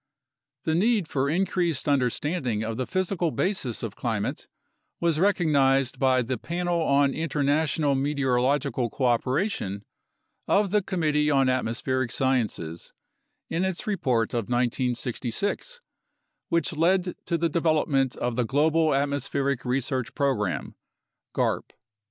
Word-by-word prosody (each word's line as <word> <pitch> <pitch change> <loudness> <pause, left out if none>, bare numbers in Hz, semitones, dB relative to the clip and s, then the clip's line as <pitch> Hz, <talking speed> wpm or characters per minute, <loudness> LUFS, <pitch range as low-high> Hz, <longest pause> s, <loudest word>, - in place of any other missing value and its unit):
The 160 - 0
need 205 +1 +2
for 140 -2 0
increased 170 -3 0
understanding 130 -3 0
of 110 0 -3
the 130 +1 -3
physical 185 -2 0
basis 150 - -1
of 110 -4 -4
climate 110 -4 -3 0.5
was 165 -2 +1
recognized 140 -9 +2
by 130 -2 +3
the 125 0 -3
Panel 175 0 -1
on 140 -2 +3
International 150 -1 +1
Meteorological 135 -2 +1
Coopera 130 - +1
tion 100 - -4 0.6
of 200 -2 +2
the 210 0 +3
Committee 155 -6 +1
on 135 -2 +3
Atmospheric 130 0 -1
Sciences 110 -12 -1 0.5
in 170 +3 -1
its 190 +3 -2
report 130 - 0
of 115 -3 -1
1966, 125 - -1 0.7
which 170 -1 +1
led 180 +3 +2
to 170 - 0
the 170 +1 +1
development 155 -5 +1
of 120 -1 -2
the 125 - +1
Global 155 +4 +2
Atmospheric 140 -1 -1
Research 130 0 -2
Pro 140 -2 +2
gram 105 -6 -3 0.6
(garp). - - -1
140 Hz, 120 wpm, -26 LUFS, 125-165 Hz, 0.7 s, by